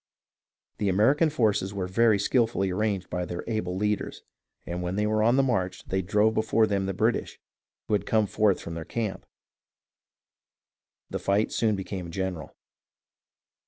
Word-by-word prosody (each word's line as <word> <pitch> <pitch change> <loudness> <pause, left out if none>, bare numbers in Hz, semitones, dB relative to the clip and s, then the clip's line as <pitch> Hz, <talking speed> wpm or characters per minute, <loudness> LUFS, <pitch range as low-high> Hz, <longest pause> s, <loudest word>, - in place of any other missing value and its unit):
The 100 - +1
American 135 - +4
forces 105 -8 0
were 95 -2 -2
very 110 +3 +3
skilfully 105 -2 +1
arranged 100 -1 -1
by 90 - -1
their 90 0 -5
able 110 -5 -2
leaders, 105 +1 -2 0.4
and 85 +1 -4
when 90 +1 -2
they 105 +1 +1
were 110 0 +1
on 115 +3 +4
the 135 - +4
march 95 -8 -1
they 95 0 -1
drove 105 +4 +2
before 110 0 +2
them 100 -2 -1
the 95 - -1
British, - - 0 0.5
who - - -1
had 105 - 0
come 110 -1 +3
forth 105 -1 +2
from 85 - -7
their 80 0 -5
camp. 110 +3 -4 1.8
The - - -2
fight 100 +2 +1
soon 110 -2 +1
became 95 -2 -5
general. 90 -4 -4
100 Hz, 160 wpm, -27 LUFS, 95-110 Hz, 1.8 s, American